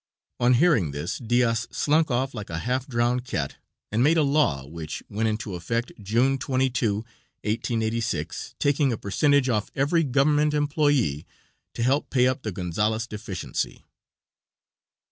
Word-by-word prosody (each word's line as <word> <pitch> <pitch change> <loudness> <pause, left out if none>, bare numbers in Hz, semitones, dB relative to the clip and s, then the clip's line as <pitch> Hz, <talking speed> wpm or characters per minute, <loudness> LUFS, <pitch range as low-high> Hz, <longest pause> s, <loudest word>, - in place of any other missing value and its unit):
On 125 +1 +4
hearing 130 - +3
this 70 +1 -4
Diaz 120 -1 +1
slunk 155 +2 +2
off 130 +2 0
like 105 -3 -7
a 85 - -3
half 125 +8 -1
drowned 120 0 +1
cat 85 - -3 0.3
and 110 +3 +1
made 155 +6 +4
a 155 - +4
law, 140 - +2
which 80 +1 -7
went 110 +2 0
into 110 -2 -3
effect 115 +8 -2
June 120 +7 +2
22, 130 -5 +1 0.5
1886, 115 +1 -2
taking 145 -1 +2
a 115 - -2
percentage 140 +7 +2
off 110 -4 0
every 150 +5 +2
government 145 +2 +2
employé 145 - +1 0.5
to 115 - -1
help 135 +4 +1
pay 125 -2 +3
up 130 +1 +1
the 110 - -3
Gonzales 105 +5 -1
deficiency. 105 -4 -5
120 Hz, 145 wpm, -25 LUFS, 105-135 Hz, 0.5 s, On